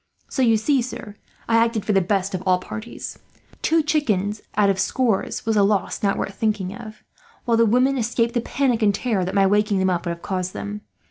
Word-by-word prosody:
"So 265 - -2
you 230 -3 +4
see, 265 +5 +2
sir, 220 -4 -7 0.3
I 230 - +3
acted 230 -2 +1
for 210 - +1
the 195 - +4
best 195 +1 0
for 185 - -2
all 185 0 +2
parties. 220 +5 -7 0.4
Two 325 0 +2
chickens 215 - 0 0.2
out 205 -1 +4
of 195 -1 +1
scores 225 +1 0
was 225 0 +1
a 205 - +4
loss 200 0 +1
not 200 -1 +1
worth 195 - -3
thinking 210 -3 -1
of, 215 -1 -10 0.4
while 235 - +2
the 230 0 +4
women 255 +4 +3
escaped 235 0 0
the 240 - +1
panic 245 -2 0
and 205 -2 +3
terror 215 -6 0
that 185 - -3
my 195 -1 +4
waking 210 +1 +2
them 190 0 +2
up 175 0 -2
would 170 - -1
have 170 - -22
caused 185 -2 -3
them. 205 +1 -6
210 Hz, 220 wpm, -22 LUFS, 195-235 Hz, 0.4 s, you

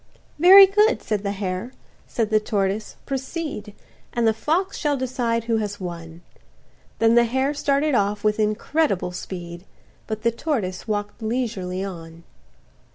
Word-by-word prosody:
"Very 385 +4 +10
good," 420 +4 +2
said 210 -2 -1
the 200 -1 -2
hare; 195 +4 -4 0.3
said 225 -3 -2
the 215 - +4
tortoise, 205 -1 -2
"Proceed, 270 -6 -5 0.4
And 235 -1 +1
the 220 - +4
fox 335 - -1
shall 295 -3 0
decide 240 -3 -1
who 230 -1 0
has 205 -2 -3
won," 170 -2 -8 0.7
Then 225 0 +4
the 240 0 +5
hare 265 +4 0
started 290 +1 +1
off 205 -2 +1
with 215 0 +1
incredible 215 - 0
speed; 175 -1 -7 0.4
But 220 -1 -4
the 235 - +3
tortoise 230 - -3
walk'd 205 +1 -3
leisurely 215 -6 -2
on. 165 -3 -8
220 Hz, 145 wpm, -23 LUFS, 195-265 Hz, 0.7 s, Very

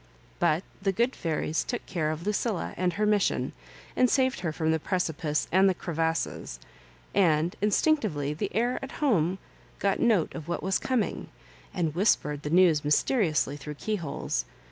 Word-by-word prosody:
But 155 +4 +2 0.2
the 195 0 +1
good 235 +7 0
fairies 160 -1 -1
took 245 - -4
care 165 -5 -1
of 155 +3 -4
Lucilla 210 -1 -1
and 180 0 0
her 210 +4 0
mission, 210 -1 +1 0.4
and 255 - +4
saved 260 0 +2
her 175 -3 -2
from 160 0 0
the 160 - +1
precipice 160 -3 -1
and 190 +2 +5
the 185 - 0
crevasses 165 - -2 0.3
— 60 0 -29 0.2
and 155 +4 -1
instinctively 205 - +1
the 150 - -3
air 240 +3 +1
at 270 - -7
home 190 - +1 0.4
got 200 -1 0
note 215 -9 +2
of 155 - -7
what 170 - -3
was 190 +1 +1
coming, 255 -5 -1 0.4
and 165 -4 -1
whispered 150 -6 +1
the 150 - -4
news 170 -3 +4
mysteriously 150 - +2
through 150 +1 -7
the - - -27
keyholes. 160 - -2
175 Hz, 165 wpm, -28 LUFS, 155-210 Hz, 0.4 s, and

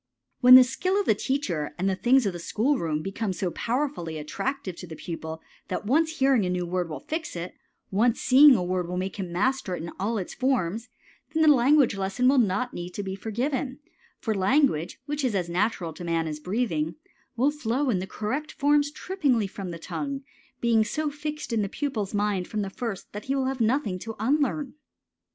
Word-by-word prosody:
When 255 -1 +10
the 255 - +11
skill 370 +10 0
of 405 - 0
the - - +4
teacher 205 - -2
and 185 +2 0
the 190 - +1
things 250 +4 +3
of 195 - 0
the 175 - -6
school 240 +11 0
room 155 -2 -1
become 195 +1 -2
so 180 0 -2
powerfully 240 - -2
attractive 190 - -4
to 180 - -8
the 160 - -8
pupil 160 -1 -6 0.2
that - - -3
once 320 +7 +2
hearing 265 -5 +4
a 180 - -1
new 180 -1 -1
word 175 0 -2
will 150 -3 -6
fix 320 - -4
it, 170 +1 -5 0.4
once 225 +5 +2
seeing 275 +1 +7
a 185 - 0
word 180 -1 -1
will 180 +1 -3
make 190 +2 -3
him 185 -3 -4
master 210 +1 0
of - - -5
it 160 - -6
in 170 - -6
all 220 +4 0
its 185 - -4
forms, 230 -4 -1 0.4
then 320 0 +2
the 305 -1 +8
language 270 -2 +4
lesson 195 +6 0
will 270 0 +5
not 215 +2 +1
need 175 0 -6
to 205 - -3
be 190 -1 -4
given; 255 +6 -2 0.4
for 220 - -2
language, 195 - +2
which 295 0 -3
is 245 -5 +1
as 180 -3 0
natural 180 -2 -1
to 175 - -9
man 165 -1 0
as 150 -1 -4
breathing, 170 -4 -1 0.4
will 260 +5 +3
flow 270 -1 0
in 185 -4 0
correct 270 +11 -3
forms 290 0 +3
trippingly 290 - 0
from 195 -1 -6
the 170 - -5
tongue, 275 - -4 0.4
being 230 -2 +3
so 295 +7 -2
fixed 300 -3 -5
in 220 - +2
the 200 - -2
pupil's 220 -8 -3
mind 205 -3 0
from 215 -2 -2
the 195 - -5
first 225 -3 -5
that 210 +1 -6
he 270 - 0
will 270 -1 0
have 260 -1 -2
nothing 220 -5 +1
to 225 +3 -6
unlearn. 275 +2 0
220 Hz, 210 wpm, -26 LUFS, 180-270 Hz, 0.4 s, the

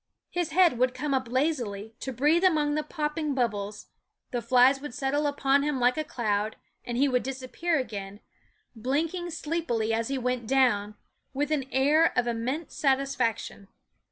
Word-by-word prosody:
His 350 -2 -1
head 335 -5 +4
would 255 0 +2
come 295 -2 -2
up 260 -2 0
lazily, 240 -6 -1
to 265 - -4
breathe 295 +8 +2
among 305 -5 +3
the 305 - +1
popping 300 -1 -2
bubbles; 210 -5 -2 0.5
the 245 - -1
flies 255 +3 +4
would 290 -4 -7
settle 285 +1 0
upon 280 -1 +2
him 290 -2 -1
like 245 0 +3
a 310 - -1
cloud, 215 -5 -1 0.3
and 240 -1 -4
he 280 +3 +4
would 250 -2 +1
disappear 270 +6 -2
again, 205 -6 -5 0.6
blinking 315 +9 -1
sleepily 300 -9 -1
as 225 0 0
he 275 - -2
went 250 -2 -2
down, 215 -6 +2 0.4
with 290 +2 -1
an 275 -4 -1
air 295 +5 +4
of 250 - +3
immense 245 +7 -3
satisfaction. 265 -7 0
265 Hz, 160 wpm, -27 LUFS, 235-300 Hz, 0.6 s, head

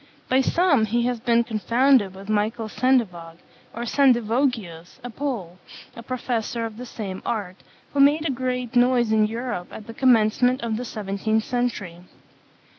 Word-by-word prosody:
By 260 +1 +4
some 285 -5 +2
he 235 +3 0
has 245 -1 -1
been 235 0 +2
confounded 230 -1 +2
with 195 +1 -11
Michael 215 +2 -1
Sendivog, 195 -10 0 0.3
or 235 - -6
Sendivogius, 235 - 0
a 245 - -6
Pole, 220 -10 -5 0.4
a 235 - -8
professor 235 -1 -3
of 220 -1 -7
the 250 +1 -8
same 195 -5 -6
art, 200 -5 -3 0.4
who 285 - -1
made 295 +3 +4
a - - 0
great 250 -1 -3
noise 245 -2 +3
in 215 -1 +3
Europe 230 -5 -4
at 215 - -10
the 230 - -9
commencement 245 0 +3
of 225 -2 -1
the 250 - -5
seventeenth 215 +1 -2
century. 230 -9 -3
235 Hz, 155 wpm, -23 LUFS, 215-250 Hz, 0.4 s, By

